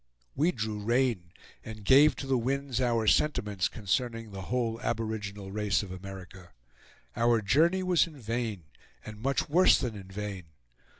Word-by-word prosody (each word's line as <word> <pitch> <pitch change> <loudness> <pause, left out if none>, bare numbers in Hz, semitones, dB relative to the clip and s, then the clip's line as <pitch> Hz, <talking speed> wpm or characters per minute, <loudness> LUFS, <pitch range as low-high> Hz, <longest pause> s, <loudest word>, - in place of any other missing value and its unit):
We 160 +6 +2
drew 110 -5 -4
rein 115 -5 0 0.3
and 110 -2 -9
gave 145 +5 +6
to - - -6
the 135 -1 +1
winds 130 +1 -1
our 115 -3 +1
sentiments 105 - +2
concerning 115 +1 -2
the 95 -1 -7
whole 115 +2 -2
aboriginal 105 -4 -4
race 105 0 0
of 95 - -9
America. 95 -1 -10 0.6
Our 115 0 +3
journey 165 - +3
was 180 -2 +3
in 155 -4 -13
vain 115 -5 -3 0.4
and 110 0 -9
much 135 +2 0
worse 180 +5 +5
than 120 -4 -3
in 95 -2 -10
vain. 95 -2 -6
115 Hz, 155 wpm, -29 LUFS, 100-130 Hz, 0.6 s, gave